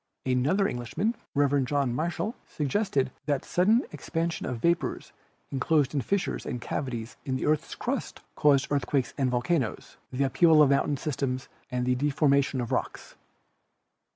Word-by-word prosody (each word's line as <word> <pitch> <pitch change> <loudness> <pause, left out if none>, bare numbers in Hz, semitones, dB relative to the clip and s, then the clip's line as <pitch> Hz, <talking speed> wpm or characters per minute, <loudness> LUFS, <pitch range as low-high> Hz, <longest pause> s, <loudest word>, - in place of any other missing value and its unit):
Another 135 +11 +2
Englishman, 145 - -2 0.2
Rev. 140 -1 +3
John 135 -1 0
Michell, 175 - -2
suggested 145 -3 0 0.2
that 145 -3 0
sudden 215 +8 +3
ex - - -9
pansion 165 0 -1
of 125 - -3
vapors 170 +8 0 0.4
enclosed 140 +1 +1
in 140 - +1
fissures 200 +7 -1
and 125 - -4
cavities 120 -2 -4
of 130 - 0
the - - -3
earth's 155 0 0
crust - - -3
caused 140 -2 +3
earthquakes 140 -2 0
and 135 -3 +1
volcanoes, 125 0 -1
the 135 +2 +1
up 135 - -3
heaval 160 -3 +7
of 140 - +4
mountain 140 +1 +2
systems 130 -2 -3 0.2
and 125 -1 -1
the 125 - +2
deformation 140 0 +2
of 120 - -4
rocks. - - -3
140 Hz, 155 wpm, -28 LUFS, 130-155 Hz, 0.4 s, heaval